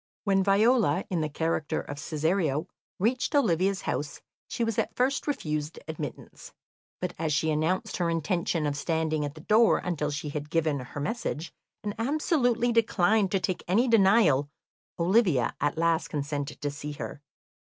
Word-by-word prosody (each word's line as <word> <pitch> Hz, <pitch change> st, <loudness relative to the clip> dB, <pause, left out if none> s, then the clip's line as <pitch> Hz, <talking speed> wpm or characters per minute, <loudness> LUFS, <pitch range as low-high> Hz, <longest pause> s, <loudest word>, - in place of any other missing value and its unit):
When 195 Hz, -2 st, +2 dB
Viola, 200 Hz, -, +3 dB
in 175 Hz, -3 st, 0 dB
the 155 Hz, -, -1 dB
character 160 Hz, 0 st, -1 dB
of 145 Hz, -, -7 dB
Cesario, 155 Hz, -1 st, 0 dB, 0.3 s
reached 245 Hz, -, 0 dB
Olivia's 195 Hz, -, +2 dB
house, 145 Hz, 0 st, -3 dB, 0.3 s
she 235 Hz, -, -2 dB
was 225 Hz, -2 st, 0 dB
at -, -, -2 dB
first 265 Hz, +4 st, 0 dB
refused 155 Hz, -, -2 dB
admittance, 155 Hz, -4 st, -7 dB, 0.5 s
but -, -, -3 dB
as 160 Hz, -1 st, -1 dB
she 160 Hz, +2 st, +1 dB
announced 155 Hz, +5 st, 0 dB
her 175 Hz, -2 st, 0 dB
intention 165 Hz, -1 st, 0 dB
of 145 Hz, -1 st, -1 dB
standing 155 Hz, 0 st, -1 dB
at 145 Hz, +1 st, -6 dB
the 155 Hz, -, -10 dB
door 220 Hz, +6 st, +4 dB
until 155 Hz, -5 st, -2 dB
she 150 Hz, +1 st, -4 dB
had 150 Hz, 0 st, -5 dB
given 155 Hz, -3 st, +1 dB
her 130 Hz, +3 st, -7 dB
message, 170 Hz, -2 st, -3 dB, 0.3 s
and 205 Hz, -1 st, -2 dB
absolutely 245 Hz, -3 st, +1 dB
declined 215 Hz, -3 st, +3 dB
to 195 Hz, -, +3 dB
take 185 Hz, -1 st, -2 dB
any 220 Hz, +8 st, +3 dB
denial, 195 Hz, -, +4 dB, 0.5 s
Olivia 175 Hz, -, +3 dB
at 145 Hz, +2 st, 0 dB
last 165 Hz, 0 st, +2 dB
consented 145 Hz, 0 st, -4 dB
to 145 Hz, -, -1 dB
see 145 Hz, +1 st, -6 dB
her. 145 Hz, -, -7 dB
165 Hz, 160 wpm, -28 LUFS, 150-210 Hz, 0.5 s, door